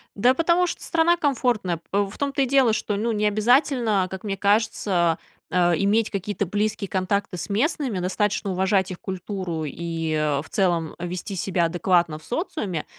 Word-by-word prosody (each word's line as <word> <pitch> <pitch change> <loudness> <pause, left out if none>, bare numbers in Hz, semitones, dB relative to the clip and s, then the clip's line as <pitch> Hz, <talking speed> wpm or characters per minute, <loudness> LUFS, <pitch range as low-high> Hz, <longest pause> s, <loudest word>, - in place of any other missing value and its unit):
Да 245 +6 +4
потому 340 +3 +2
что - - -5
страна 335 +1 +3
комфортная. 245 - 0
П 200 - +1
м, 200 -1 0
в - - -11
том-то 280 0 -1
и - - +4
дело, 260 -4 +4
что, 210 -1 -1
ну, 230 +3 0
не 210 -1 0
обязательно, 220 -2 +2
как 190 +1 -7
мне 200 -2 -2
кажется, 200 -5 +2 0.4
э, 175 -1 +3
иметь 210 +3 +2
какие-то 200 0 -2
близкие 210 +2 -1
контакты 190 0 -1
с 165 - -5
местными, 245 - 0
достаточно 195 +2 -1
уважать 190 +1 +1
их 185 - -8
культуру 185 -4 -4
и, 165 +1 -3
э, 150 -2 +1
в - - -12
целом 170 -5 0
вести 180 +3 -5
себя 180 -1 0
адекватно 170 -2 +1
в - - -20
социуме. 220 - -3
200 Hz, 175 wpm, -24 LUFS, 180-225 Hz, 0.4 s, Да